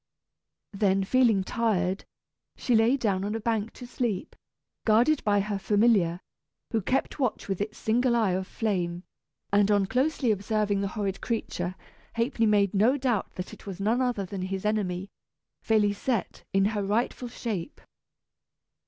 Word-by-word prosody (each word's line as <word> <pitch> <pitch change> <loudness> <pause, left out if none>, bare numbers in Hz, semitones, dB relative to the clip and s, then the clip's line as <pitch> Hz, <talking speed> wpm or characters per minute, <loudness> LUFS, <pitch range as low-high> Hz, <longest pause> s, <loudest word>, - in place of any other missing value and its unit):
Then, 195 -1 +2
feeling 225 -2 +3
tired, 195 -4 0 0.5
she 250 - 0
lay 230 +4 +4
down 200 -7 0
on 205 +2 -2
a - - -2
bank 225 -1 -1
to 250 - -10
sleep, 240 -5 -3 0.5
guarded 240 +7 +3
by 205 -2 +3
her 205 0 -2
familiar, 200 -5 +3 0.5
who 225 - +1
kept 260 +9 -1
watch 255 -5 -1
with 195 -1 -2
its 215 +1 -4
single 240 +2 +2
eye 220 -5 +2
of 185 +1 -2
flame; 180 -6 -2 0.5
and 205 0 +4
on 205 -2 +3
closely 260 +2 +1
observing 205 0 0
the 200 - 0
horrid 195 -2 -2
creature 185 -6 -3 0.4
Ha'penny 230 -1 +1
made 200 -2 +3
no 225 +8 +3
doubt 250 -7 -1
that 180 - -6
it - - -13
was 190 -1 -6
none 220 +5 +1
other 245 -6 0
than 190 +1 -6
his 190 +1 -4
enemy, 200 -3 -1 0.5
Félisette, 215 +2 0
in 195 0 +3
her 205 -2 -1
rightful 230 +5 -1
shape. 220 -7 -5
210 Hz, 155 wpm, -27 LUFS, 195-230 Hz, 0.5 s, lay